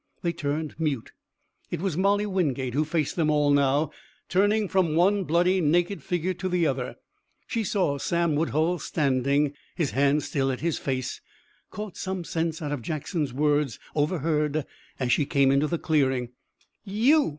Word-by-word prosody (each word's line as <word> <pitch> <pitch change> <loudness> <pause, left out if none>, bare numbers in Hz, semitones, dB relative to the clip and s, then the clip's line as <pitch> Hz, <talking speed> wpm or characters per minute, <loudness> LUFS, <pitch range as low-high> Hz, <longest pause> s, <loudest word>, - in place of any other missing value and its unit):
They 170 -1 0
turned 150 +1 -3
mute. 145 -7 -2 0.6
It 175 - -3
was 185 -3 -1
Molly 200 +3 +2
Wingate 140 - -1
who 150 +3 +1
faced 155 -2 -1
them 160 -3 +1
all 150 -1 +3
now, 145 +2 +3 0.4
turning 205 +3 +2
from 180 -5 +1
one 195 +3 +3
bloody, 180 +4 +3
naked 175 +5 +1
figure 180 +1 -1
to 185 +1 -4
the 175 -2 +2
other. 130 -4 -1 0.5
She 230 -2 -2
saw 180 -9 0
Sam 170 +2 +1
Woodhull 160 +3 +1
standing, 140 0 +1 0.2
his 160 -6 0
hands 140 +2 +2
still 135 -2 0
at 130 - -5
his 165 0 0
face; 130 -2 -3 0.5
caught 210 -3 -7
some 190 -2 -3
sense 160 -1 -2
out 145 - -3
of 145 -4 -2
Jackson's 155 - -2
words, 145 -1 +1 0.2
overheard 150 -1 0 0.3
as 125 -2 0
she 140 +3 +2
came 140 -1 +3
into 140 +2 +3
the 170 - -1
clearing. 135 -6 +1 0.5
"You!" 235 +10 +3
155 Hz, 160 wpm, -26 LUFS, 140-180 Hz, 0.6 s, all